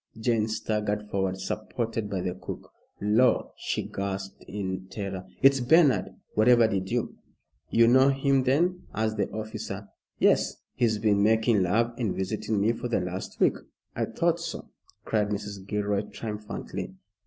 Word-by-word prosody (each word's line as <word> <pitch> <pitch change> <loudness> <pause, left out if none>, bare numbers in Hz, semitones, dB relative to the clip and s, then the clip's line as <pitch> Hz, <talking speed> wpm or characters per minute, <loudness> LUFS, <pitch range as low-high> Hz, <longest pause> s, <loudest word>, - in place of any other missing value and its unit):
Jane 110 -2 +1
staggered 105 -1 -2
forward 95 -1 0
supported 110 +2 -3
by 95 -2 -2
the 90 0 -2
cook. 90 - -8 0.3
"Lor'," 110 +5 +3
she - - -2
gasped 95 0 -5
in 95 -2 -4
terror, 95 -2 -5 0.2
"it's 135 0 +7
Bernard. 145 +3 +4 0.2
Whatever 115 +1 +5
did 95 -3 -2
you - - -2 0.2
" - - -46
"You 115 0 +5
know 130 +3 +6
him, 135 0 +2
then?" 170 +8 +1
asked 110 0 0
the 100 - 0
officer. 110 -2 -6 0.3
"Yes! - - +3 0.2
he's 110 -3 +1
been 105 -2 +2
making 110 0 +3
love 115 +6 +2
and 110 -6 0
visiting 105 +2 -1
me 105 +3 +3
for 120 - -4
the 120 - +1
last 90 +1 -5
week?" - - +3 0.4
"I - - 0
thought - - 0
so," - - -6 0.3
cried 105 -2 +1
Mrs. 100 -2 -5
Gilroy, 105 -1 0
triumphantly. 105 -3 -6
105 Hz, 155 wpm, -27 LUFS, 100-115 Hz, 0.4 s, it's